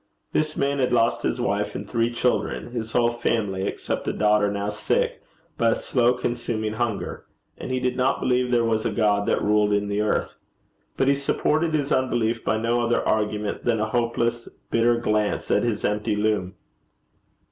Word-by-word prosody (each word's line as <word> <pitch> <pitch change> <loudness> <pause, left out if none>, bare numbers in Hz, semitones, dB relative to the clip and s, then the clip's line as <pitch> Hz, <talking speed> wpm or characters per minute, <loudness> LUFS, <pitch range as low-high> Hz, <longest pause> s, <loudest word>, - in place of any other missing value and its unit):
This 155 0 0
man 140 0 0
had 125 -1 +1
lost 115 -1 +2
his - - -1
wife - - -1
and - - -5
three 115 0 0
children, 120 0 -1
his 115 -2 -4
whole 120 -1 +3
family 105 -5 -1
except - - -4
a - - 0
daughter 105 -1 +3
now 100 0 -2
sick, 105 - -1 0.4
by 115 - +4
a - - +2
slow 125 -1 +2
consuming 120 -3 -2
hunger; 115 -1 -3 0.3
and - - -7
he 130 0 0
did 125 0 -1
not 130 +1 +1
believe 125 0 +1
there 120 -1 +2
was 110 -1 +1
a - - 0
God 105 -2 +1
that - - +1
ruled 105 0 +3
in 100 0 0
the 100 +1 0
earth. 105 - 0 0.6
But 135 - +2
he 140 - +5
supported 155 +3 0
his 145 -1 -1
unbelief 120 -3 +1
by 110 - +1
no 115 +2 +1
other 120 0 0
argument 105 -1 -1
than 115 -2 +1
a 110 0 -1
hopeless 120 0 -1 0.2
bitter 120 +1 +3
glance 105 -3 0
at - - +3
his 115 -3 -1
empty 105 0 0
loom. 105 -3 0
115 Hz, 185 wpm, -24 LUFS, 105-125 Hz, 0.6 s, he